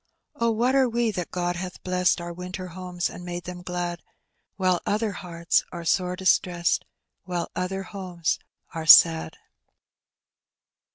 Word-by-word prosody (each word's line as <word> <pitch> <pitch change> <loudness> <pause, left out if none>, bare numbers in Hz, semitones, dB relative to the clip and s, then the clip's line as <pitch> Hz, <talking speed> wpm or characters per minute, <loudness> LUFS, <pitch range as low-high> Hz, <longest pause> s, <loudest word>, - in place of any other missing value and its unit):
Oh, 235 0 0
what 235 +3 +1
are 265 -2 +4
we, 235 -1 +1
that 180 -4 -4
God 175 -1 -2
hath 180 0 -7
blegaed 180 -1 +2
Onr 170 0 -6
winter 180 +1 -6
homes 180 0 -3
and 180 - -9
made 175 0 -5
them 180 0 -7
glad. 175 -1 -4 0.5
While 185 -2 +1
other 215 +1 0
hearts 170 -3 0
ore 170 -1 -7
sore 180 +2 +1
distreseed, 180 -2 +2 0.4
While 175 -2 -3
other 190 +1 -2
homes 180 -4 -3 0.3
are 160 -1 -5
sad 160 0 +7
180 Hz, 145 wpm, -25 LUFS, 175-190 Hz, 0.5 s, sad